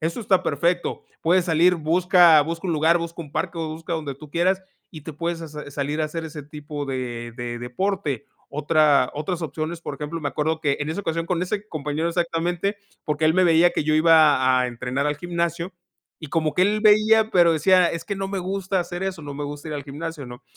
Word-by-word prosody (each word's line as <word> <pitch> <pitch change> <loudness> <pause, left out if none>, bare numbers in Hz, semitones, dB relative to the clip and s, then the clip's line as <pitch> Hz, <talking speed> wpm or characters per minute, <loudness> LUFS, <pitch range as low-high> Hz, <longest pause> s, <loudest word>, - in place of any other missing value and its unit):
Eso 165 +9 -2
está 190 -3 +2
perfecto. 170 +5 -1 0.2
Puedes 175 +2 +3
salir, 170 +2 +4
busca 170 0 +5
busca 165 +4 -5
un 170 - 0
lugar, 160 +2 +3
busca 170 0 -5
un 150 -2 -14
parque 170 -2 -3
o 160 -1 -2
busca 165 +2 -6
donde 150 -4 -4
tú 150 +1 -13
quieras, 185 +3 +1 0.3
y 155 -4 -10
te 160 - -7
puedes 170 +2 -3
sa 165 - -7
sa 150 -1 -8
salir 145 +2 -2
a 155 - +2
hacer 160 +2 -4
ese 155 -2 -7
tipo 145 0 -7
de 120 -3 -4
de 120 -1 -5
deporte. 145 - -2 0.2
Otra 150 -2 +3
otras 170 +3 -3
opciones, 160 +3 -4
por 145 - -6
ejemplo, 150 +3 -5
me 145 - -2
acuerdo 155 +1 -1
que, 145 -3 +1
en 145 - -2
esa 170 - -3
ocasión, 165 -3 -2
con 180 -1 -1
ese 205 +3 -3
compañero 155 +2 -2
exactamente, 175 +3 -1 0.3
porque 150 +1 -1
él 160 +1 +4
me 185 - +4
veía 170 0 +5
que - - -2
yo 155 - +2
iba 150 -5 +5
a 125 - +1
entrenar 125 +4 -2
al 145 0 -1
gimnasio 170 +1 -3 0.5
y 155 - -8
como 155 -1 0
que 180 - +3
él 210 +2 +2
veía, 215 +1 +5
pero 170 -2 +5
decía: 180 +3 +4
"Es 165 0 -5
que 200 - -3
no 195 0 -3
me 195 -1 -3
gusta 190 +1 -2
hacer 175 +1 -5
eso, 190 -4 -4
no 145 -1 -7
me 145 - -4
gusta 145 +2 -7
ir 150 - -4
al 145 - -4
gimnasio", 150 0 -6
¿no? 120 0 -11
160 Hz, 225 wpm, -23 LUFS, 150-175 Hz, 0.5 s, busca